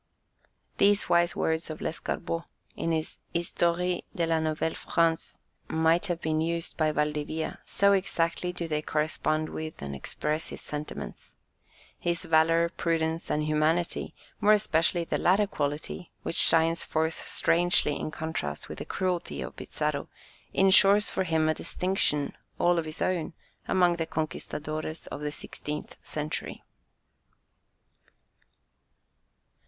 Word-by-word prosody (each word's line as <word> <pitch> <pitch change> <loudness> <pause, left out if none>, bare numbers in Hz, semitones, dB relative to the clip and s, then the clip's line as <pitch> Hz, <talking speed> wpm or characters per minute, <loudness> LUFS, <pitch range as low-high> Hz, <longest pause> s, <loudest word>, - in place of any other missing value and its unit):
These 205 -1 +4
wise 170 -1 +4
words 160 0 0
of 155 - -5
Lescarbot, 165 +1 -3 0.3
in 165 - -1
his 160 -1 -2 0.2
Histoire 175 +1 +1 0.2
de 170 - +1
la 165 -1 +2
Nouvelle 160 0 0
France, 165 -1 0 0.3
might 165 +4 +3
have 175 -2 -1
been 155 -1 0
used 170 +1 -2
by 155 -1 +2
Valdivia, 150 +1 -2
so 200 0 +4
exactly 180 -2 0
do 175 -1 -4
they 150 -1 0
correspond 155 0 0
with 155 0 -6
and 70 -1 -5
express 155 - -2
his - - -7
sentiments. 150 0 -7 0.6
His 170 0 -1
valour, 165 +1 +4
prudence, 165 -1 -1
and 150 - +1
humanity, 155 +3 +1 0.2
more 210 0 +6
especially 170 -4 +2
the - - -1
latter 195 +4 +4
quality, 150 0 -3
which - - -3
shines 165 0 +4
forth 160 +1 -1
strangely 175 -3 +3
in - - -3
contrast 155 - -4
with - - -7
the - - -5
cruelty 180 -2 -2
of - - -7
Pizarro, - - -2 0.4
ensures 195 +2 +6
for 190 - 0
him 160 -2 +2
a 155 - +3
distinction 170 -5 0 0.2
all 175 -1 +3
his 155 -1 -4
own 175 -3 -1 0.3
among 180 -2 +3
the 165 -1 -2
"conquistadores" 155 0 -4
of 145 - -5
the 150 0 -2
sixteenth 150 0 -6
century. 150 0 -4
165 Hz, 130 wpm, -28 LUFS, 155-175 Hz, 0.6 s, more